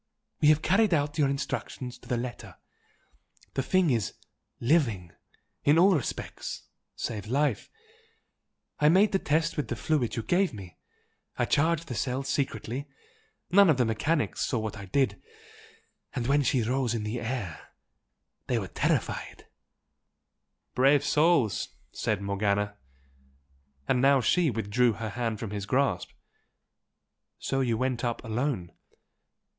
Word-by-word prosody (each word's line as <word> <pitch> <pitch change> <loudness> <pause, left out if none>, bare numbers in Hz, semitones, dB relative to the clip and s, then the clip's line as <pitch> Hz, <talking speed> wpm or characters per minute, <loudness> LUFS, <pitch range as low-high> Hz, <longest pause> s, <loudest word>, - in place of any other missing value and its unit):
We 150 - +5
have 155 0 +5
carried 200 -2 +3
out 145 +1 -1
your 140 -2 +4
instructions 135 -2 -4
to - - -17
the 125 - 0
letter 120 0 -6 1.0
the - - 0
thing 180 +2 +2
is 115 -4 -1 0.4
LIVING, 115 - +1 0.5
in 145 +2 +5
all 190 +3 +6
respects 140 - -4 0.3
save 105 -3 -4
life. 135 -1 0 1.1
I 150 - +5
made 195 +6 +5
the 195 - +2
test 160 +2 0
with 150 - -1
the - - -3
fluid 145 -8 0
you 115 - -2
gave 180 - +1
me 95 -4 -11 0.6
I - - +2
charged 165 +2 +1
the 125 - -4
cells 130 +4 -2
secretly 135 0 -2 0.6
none 200 0 +7
of 150 - +4
the 125 - +3
mechanics 145 +8 0
saw 125 - 0
what 110 -1 -3
I 100 -2 -8
did 135 +8 0 0.9
and 125 -3 -2
when 140 +3 +3
she 130 -2 +1
rose 125 0 0
in 110 -2 -3
air 115 -6 -4 0.8
they 125 - +1
were 95 -5 -3
terrified - - -2 0.7
" - - -54
"Brave 140 +2 +4
souls!" 150 - +2 0.2
said 105 -4 -2
Morgana, 100 +1 0 1.1
and 125 - +2
now 140 +1 +5
she 160 +7 +3
withdrew 115 +1 +1
her 110 +1 -5
hand 115 0 -2
from 110 -3 -5
his 100 -1 -4
grasp 135 +3 +1 1.3
"So 135 - -2
you 120 -4 +1
went 130 0 -1
up 120 -1 -2
alone?" 110 -6 -2
125 Hz, 140 wpm, -28 LUFS, 110-150 Hz, 1.3 s, none